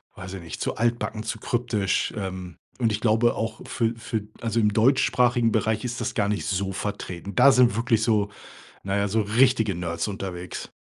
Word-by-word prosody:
weiß 95 0 -8
ich 95 - -6
nicht, 85 - -8
zu - - -1
altbacken, 115 -1 -1
zu 110 - -4
kryptisch, 115 -4 0
ähm, 95 -3 -5 0.2
und 115 -3 +2
ich 105 +1 -2
glaube 115 +1 +3
auch 110 0 -3
für 115 -1 0
für, 115 -2 -3 0.2
also, 115 0 0
im 105 -2 +2
deutschsprachigen 120 0 +3
Bereich 110 0 0
ist 120 -1 -4
das - - -3
gar 100 -3 +1
nicht 105 - -1
so 95 0 -1
vertreten. 100 -1 -5
Da 140 - +7
sind 125 -4 +4
wirklich 115 -1 +1
so, 105 -3 +2 0.5
na 95 0 -1
ja, 100 0 +1
so 110 +3 +1
richtige 110 0 +3
Nerds 85 +1 -3
unterwegs. 90 -3 -6
110 Hz, 190 wpm, -25 LUFS, 100-115 Hz, 0.5 s, Da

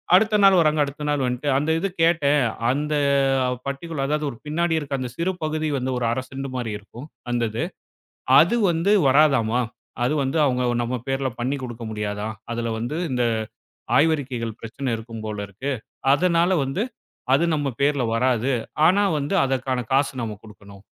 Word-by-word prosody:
அடுத்த 210 +2 +4
நாள் 195 -1 +7
வரங்க. 155 -1 +3
அடுத்த 145 +1 -7
நாள் 145 -2 +1
வந்துட்டு 125 +3 -2
அந்த 150 +3 -1
இது 195 - -1
கேட்டேன். 150 -4 +3 0.3
"அந்த 150 +3 -1 0.7
பட்டிக்குலர் 140 +1 -3
அதாவது 150 +1 0
ஒரு 120 - -9
பின்னாடி 165 +2 0
இருக்க 140 -2 -3
அந்த 125 -1 -3
சிறு 180 +3 0
பகுதி 155 0 -1
வந்து, 130 0 -2
ஒரு 125 - -1
1/2 125 +2 -1
செண்டு 135 0 -6
மாரி 120 -4 -3
இருக்கும், 120 +7 -11 0.2
அந்த 120 -1 0
இது. 110 - -2 0.8
அது 175 +9 +3
வந்து 170 +4 +1 0.2
வராதாமா, 130 -5 +4 0.4
அது 135 +5 +1
வந்து 135 +4 -1
அவங்க 125 -2 +1 0.2
நம்ம 120 +2 -2
பேர்ல 135 0 0
பண்ணி 135 +4 -1
குடுக்க 120 -1 -7
முடியாதான். 105 +1 -3 0.2
அதுல 115 0 -2
வந்து 120 +8 -3
இந்த 125 -1 +1 0.7
ஆய்வறிக்கைகள் 130 -7 0
பிரச்சன 120 +3 -4
இருக்கும் 115 0 -8
போல 105 -1 -4
இருக்கு. 130 +9 -4 0.4
அதனால 170 +2 +2
வந்து 135 - -1 0.5
அது 160 - +3
நம்ம 145 -1 -1
பேர்ல 140 -2 +2
வராது. 125 +2 +1 0.4
ஆனா 200 +3 +3 0.2
வந்து 145 +8 -1
அதற்கான 130 -2 -1
காசு 140 +1 +2
நம்ம 110 -2 -4
குடுக்கணும்." 100 -2 -14
135 Hz, 165 wpm, -23 LUFS, 120-155 Hz, 0.8 s, நாள்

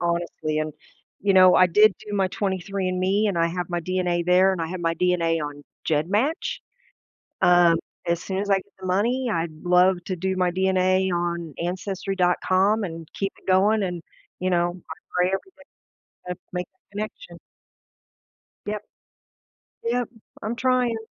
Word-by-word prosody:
honestly, 170 -3 -1
and, 155 0 -2 0.5
you 200 0 +2
know, 185 -1 +7
I 185 - +6
did 210 +4 +5
do 205 - -4
my 190 -2 +2
23andMe 190 +1 -1
and 180 -4 -1
I 165 - +3
have 175 0 -3
my 175 0 -1
DNA 180 -1 -1
there 185 +2 +5
and 180 - -3
I 165 - -1
have 185 +1 -5
my 165 0 0
DNA 165 -2 +1
on 145 0 -6 0.2
GEDmatch? 200 - 0 0.8
Um, 175 -1 +6 0.3
as 170 0 0
soon 190 0 -3
as 205 0 -3
I 195 - +5
get 190 - -2 0.2
the 185 - -8
money, 235 +7 +1
I'd 165 -3 -1
love 180 +1 +4
to 185 - -2
do 190 +2 -1
my 180 -1 +1
DNA 185 0 +2
on 170 -3 -2
ancestry.com 190 +2 +1
and 165 -3 -6
keep 195 -1 -2
it - - -23
going 205 +3 +4
and, 175 -2 -3 0.4
you 185 0 0
know, 175 -1 +2
I 180 0 -10 0.2
pray 180 0 +4
every 195 - +1 0.7
day 180 - -8
to - - -22 0.2
make 180 -1 -3
that 205 - -19
connection. 175 -5 -6 1.3
Yep. 210 0 -3 1.0
Yep, 240 +1 0 0.3
I'm 225 +3 -3
trying. 255 -2 +2
185 Hz, 160 wpm, -24 LUFS, 175-195 Hz, 1.3 s, know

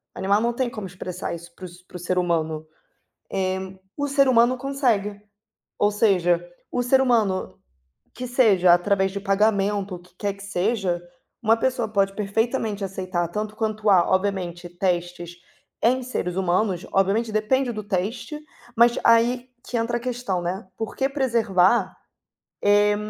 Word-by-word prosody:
Animal 200 +3 +1
não 235 +1 +1
tem 250 0 -1
como 210 -4 -6
expressar 180 0 -6
isso 170 +1 -12
para - - -14
o 185 - -4
s 175 +1 -15
para - - -16
o - - -10
ser 180 +1 -2
humano. 160 -3 0 0.7
Eh, 190 0 -2 0.2
o 285 0 -1
ser 275 -1 +3
humano 245 0 +4
consegue, 245 -7 0 0.6
ou 205 - +3
seja, 180 -5 +2 0.3
o 245 - 0
ser 260 +2 +4
humano, 225 -7 +1 0.6
que 250 +1 -5
seja 210 -8 +4
através 190 +1 +1
de 200 - -4
pagamento 200 -1 +1
o - - -10
que 180 0 -21
quer 200 -1 -1
que 200 - -13
seja, 195 -2 -1 0.4
uma 225 +1 +4
pessoa 245 -1 0
pode 195 -1 +1
perfeitamente 215 +1 -1
aceitar 185 -2 -2
tanto 210 +4 -4
quanto 215 -1 0
a, 180 -3 +5
obviamente, 185 -2 -1
testes 175 -1 -2 0.5
em 255 +3 +3
seres 180 -8 -3
humanos, 185 0 0
obviamente 200 +4 +2
depende 240 +4 +1
do 215 -2 -6
teste, 210 - -3 0.4
mas 235 +1 +5
aí 240 +2 +3 0.2
que 245 - -4
entra 235 +1 0
a - - -13
questão, 240 -7 -2
né, 185 +3 -4
por 225 - -5
que 270 - +1
preservar, 230 -7 +2 0.9
eh, 205 - +2
200 Hz, 160 wpm, -23 LUFS, 185-235 Hz, 0.9 s, a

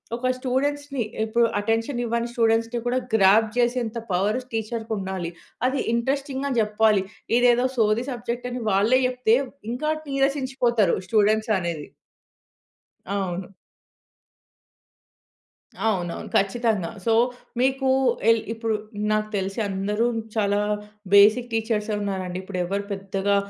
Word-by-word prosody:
ఒక 250 +2 -2
స్టూడెంట్స్‌ని 275 0 -1 0.2
ఇప్పుడు 235 +2 +2
అటెన్షన్ 225 +4 -1
ఇవ్వని 235 +1 -1
స్టూడెంట్స్‌ని 230 0 +1
కూడా 250 +1 +1
గ్రాబ్ 215 +1 +5
చేసేంత 240 -1 0
పవర్ 205 +7 +1
టీచరుకుండాలి. 215 -6 -3 0.4
అది 265 +1 0
ఇంట్రెస్టింగ్‌గా 275 +3 -1
జెప్పాలి. 210 -2 +3 0.3
ఇదేదో 245 0 +4
సోది 220 +2 +2
సబ్జెక్ట్ 245 0 -4
అని 245 0 -4
వాళ్ళే 210 +7 +4
చెప్తే, 250 -3 +2 0.4
ఇంకా 305 +6 -1 0.2
నీరసించిపోతారు 265 -7 +1
స్టూడెంట్స్ 215 +2 +2
అనేది. 170 -4 -4 1.2
అవును. 190 -2 -3 2.4
అవునవును, 175 -5 -2
ఖచ్చితంగా. 200 -3 +1 0.2
సో, 225 - +3 0.5
మీకు 265 +1 +2 0.4
ఎల్ 230 -1 +4
ఇప్పుడు 225 -1 -1 0.4
నాకు 215 0 0
తెలిసి 195 +2 -3
అందరు 205 +4 0 0.3
చాలా 205 -2 +2 0.5
బేసిక్ 215 +5 +6
టీచర్సే 220 -1 -1
ఉన్నారండి. 190 -3 -3
ఇప్పుడెవరు 190 +1 -2
పెద్దగా 195 +1 -1
225 Hz, 100 wpm, -24 LUFS, 200-245 Hz, 2.4 s, బేసిక్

